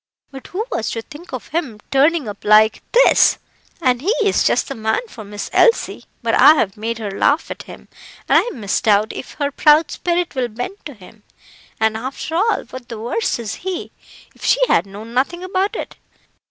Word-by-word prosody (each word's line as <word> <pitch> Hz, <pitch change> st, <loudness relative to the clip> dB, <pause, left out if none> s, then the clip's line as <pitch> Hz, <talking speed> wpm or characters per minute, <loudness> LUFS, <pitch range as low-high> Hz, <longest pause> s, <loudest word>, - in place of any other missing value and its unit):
But 270 Hz, -1 st, -10 dB
who 415 Hz, +5 st, -3 dB
was 220 Hz, -, -2 dB
to 225 Hz, -, -4 dB
think 310 Hz, +8 st, -13 dB
of 255 Hz, -3 st, -7 dB
him 285 Hz, -10 st, -3 dB
turning 290 Hz, 0 st, +3 dB
up 205 Hz, -1 st, -8 dB
like 215 Hz, +1 st, +5 dB
this? -, -, +5 dB, 0.4 s
And 255 Hz, -6 st, +1 dB
he's 405 Hz, -, +1 dB
just -, -, +2 dB
the 275 Hz, -, -4 dB
man 220 Hz, -, -1 dB
for 230 Hz, -, -10 dB
Miss 205 Hz, 0 st, -6 dB
Elsie; 465 Hz, -, +2 dB, 0.2 s
but -, -, 0 dB
I 310 Hz, -, +7 dB
have 195 Hz, -9 st, 0 dB
made 225 Hz, +2 st, -3 dB
her 210 Hz, -3 st, -5 dB
laugh 285 Hz, +10 st, +1 dB
at -, -, -6 dB
him, -, -, -12 dB, 0.4 s
and -, -, +5 dB
I -, -, -4 dB
misdoubt 210 Hz, -1 st, +1 dB
if -, -, -8 dB
her 285 Hz, -1 st, -2 dB
proud 300 Hz, +3 st, +4 dB
spirit 350 Hz, 0 st, -1 dB
will 255 Hz, -3 st, -1 dB
bend 245 Hz, -, -7 dB
to 290 Hz, -, -8 dB
him. 210 Hz, +2 st, -16 dB, 0.6 s
And 220 Hz, 0 st, +2 dB
after 260 Hz, +7 st, -5 dB
all, 415 Hz, +6 st, +1 dB
what 255 Hz, -1 st, -9 dB
the 230 Hz, -, -6 dB
worse 230 Hz, 0 st, -1 dB
is 225 Hz, -3 st, -5 dB
he, 370 Hz, -1 st, -4 dB, 0.4 s
if -, -, -17 dB
she -, -, +3 dB
had -, -, +2 dB
known 210 Hz, +4 st, -10 dB
nothing 310 Hz, +8 st, 0 dB
about 375 Hz, +2 st, -1 dB
it. -, -, -6 dB
255 Hz, 195 wpm, -19 LUFS, 220-340 Hz, 0.6 s, I